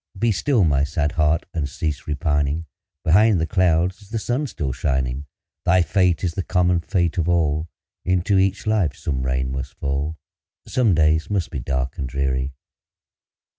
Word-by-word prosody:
Be 115 +3 +2
still, 105 - +2 0.2
sad 75 0 -1
heart! 80 +2 +1
and 75 -4 -2
cease 75 -2 -4
repining; 75 +1 0 0.4
Behind 95 +4 +5
the 80 - +1
clouds 90 0 +1
is 100 - -17
the 115 - -2
sun 125 +6 -1
still 70 - -3
shining; 65 +1 -2 0.4
Thy 90 +1 +4
fate 90 -1 +2
is 85 -3 0
the 95 - -2
common 90 -1 +2
fate 85 0 0
of 85 +1 0
all, 80 -2 +1 0.3
Into 95 +2 +2
each 95 0 +1
life 105 -9 +1
some 65 -3 -3
rain 65 0 -1
must 65 0 -5
fall, 70 +3 -2 0.5
Some 115 -8 +2
days 80 0 +2
must 100 -5 -1
be 70 - -3
dark 65 +1 -2
and 65 - -3
dreary. 65 0 -1
80 Hz, 165 wpm, -22 LUFS, 70-95 Hz, 0.5 s, Behind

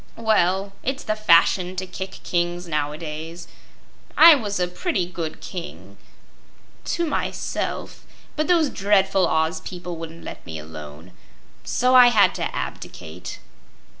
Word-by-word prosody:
"Well, 195 -3 +1
it's 270 +2 -3
the 215 - -1
fashion 185 -2 +4
to 185 0 -3
kick 190 +1 -7
kings 175 0 -1
nowadays. 155 +2 -4 0.7
I 330 +1 +10
was 210 -9 -1
a 180 - +1
pretty 185 - -1
good 170 -3 -6
King 90 +7 -8 0.9
to 340 - -1
myself 300 - -3 0.3
but 305 0 0
those 335 -5 +3
dreadful 195 -2 +2
Oz 160 +2 0
people 175 -1 -7
wouldn't 165 0 -9
let - - -9
me 80 - -7
alone. 75 +2 -10 0.5
So 250 +1 +1
I 250 -1 +9
had 205 -6 +5
to - - -4
abdicate." 80 +3 -7
180 Hz, 130 wpm, -23 LUFS, 160-210 Hz, 0.9 s, I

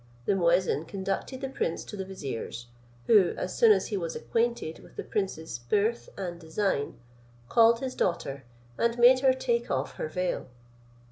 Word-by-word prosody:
The - - +3
muezin 175 -3 +2
conducted 195 +7 -3
the 270 - -3
prince 170 -10 -2
to - - -8
the 195 - -3
vizier's; 135 -10 -6 0.4
who, 200 - +5
as - - -3
soon 460 -2 +6
as 425 - +2
he 210 - -1
was 170 -3 -3
acquainted 230 -8 -1
with - - -17
the - - -4
prince's 160 - -3
birth 210 - 0
and 175 -3 -5
design, 160 -2 -1 0.5
called 230 0 +5
his 260 -1 -3
daughter, 140 -6 -1 0.4
and 235 0 +1
made 245 +2 +7
her 265 0 +5
take 240 -2 -1
off 135 +1 -2
her - - -2
veil. 180 +3 -2
195 Hz, 165 wpm, -28 LUFS, 165-235 Hz, 0.5 s, made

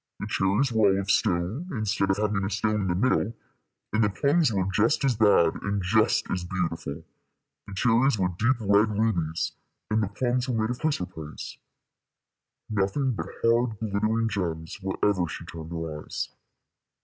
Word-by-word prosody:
The - - -4
cherries 100 +8 +1
were 110 -3 +4
all - - 0
of 100 0 0
stone, 90 - 0
instead 105 -4 0
of 95 - +2
having 105 -2 0
a 95 - -1
stone 105 +1 0
in 95 - -1
the 85 - 0
middle; 115 +1 +1 0.6
and 110 +1 +3
the 105 - +3
plums 140 - +2
were 95 -3 0
just 115 +9 +2
as 130 -3 +2
bad 100 -7 +4
and 100 0 -1
just 110 +4 +3
as 90 -1 -1
beautiful 90 -2 -3 0.6
the 100 - -8
cherries 120 +4 +3
were 90 -2 +1
deep 130 +4 +3
red 105 +1 +4
rubies, 85 -8 0 0.4
and 110 +1 +3
the 105 - 0
plums 125 +5 -1
were 115 -3 0
made 110 +2 0
of 125 - -5
chrysoprase. 90 - -4 1.1
Nothing 105 +6 0
but 115 - -4 0.2
hard 115 -1 +2
glittering 110 +2 0
gems 85 -5 -3
wherever 95 -1 0
she - - -7
turned 80 -1 -8
her 80 -3 -5
eyes. - - -4
105 Hz, 170 wpm, -26 LUFS, 95-115 Hz, 1.1 s, were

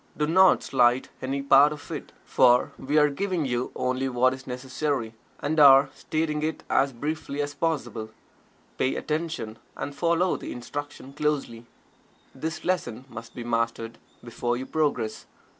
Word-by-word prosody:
Do 150 - +1
not 185 +4 +5
slight 125 -1 +2
any 135 +1 -2
part 140 +2 +6
of 150 -1 -9
it, - - -6
for 125 0 +4
we 145 +3 0
are 150 -1 +5
giving 180 0 -1
you 125 -1 -2
only 130 +1 -1
what 130 +1 +3
is 130 0 -10
necessary, 130 -1 -3 0.3
and 155 +2 -1
are 135 -1 +8
stating 155 -1 -2
it 155 +1 -3
as 135 0 +3
briefly 145 +3 -4
as 145 0 -2
possible. 145 -8 -2 0.7
Pay 130 - +1
attention, 155 -8 -3 0.2
and 145 - -4
follow 170 +4 +1
the - - -7
instruction 140 +2 -7
closely. 140 -6 -2 0.7
This 160 +5 -5
lesson 130 -10 -1
must 115 -1 -10
be 120 - -5
mastered 115 -1 -2 0.2
before 120 0 -2
you 130 - -5
progress. 130 -9 -1
135 Hz, 150 wpm, -26 LUFS, 120-150 Hz, 0.7 s, are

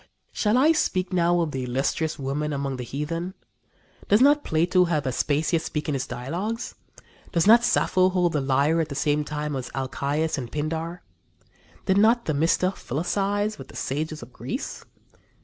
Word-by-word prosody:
Shall 215 +2 +1
I 295 +5 +5
speak 185 - 0
now 175 0 +3
of 160 -3 -1
the 130 -2 -3
illustrious 135 +5 -1
women 145 +2 -2
among 140 -1 -2
the 125 - -5
heathen? 165 - -4 0.7
Does 205 - +5
not 290 +3 +5
Plato 175 +3 +2
have 155 -4 -1
Aspasia 150 +5 +1
speak 150 -1 -4
in 150 - 0
his 135 -1 -2
dialogues? 180 - -4 0.6
Does 170 - +2
not 230 +3 +7
Sappho 185 -5 +3
hold 180 -2 +1
the 150 - +1
lyre 140 +5 +2
at 160 - -3
the 140 - -5
same 145 +2 +1
time 150 0 -4
as 130 -2 -4
Alcæus 140 +4 -1
and 120 -3 -7
Pindar? 160 +3 -3 0.8
Did 190 0 +3
not 230 +3 +4
Themista 165 +5 +1
philosophize 200 - -1
with 135 - -9
the - - -14
sages 150 +1 -3
of 120 +1 -14
Greece? 130 - -5
160 Hz, 165 wpm, -25 LUFS, 140-185 Hz, 0.8 s, not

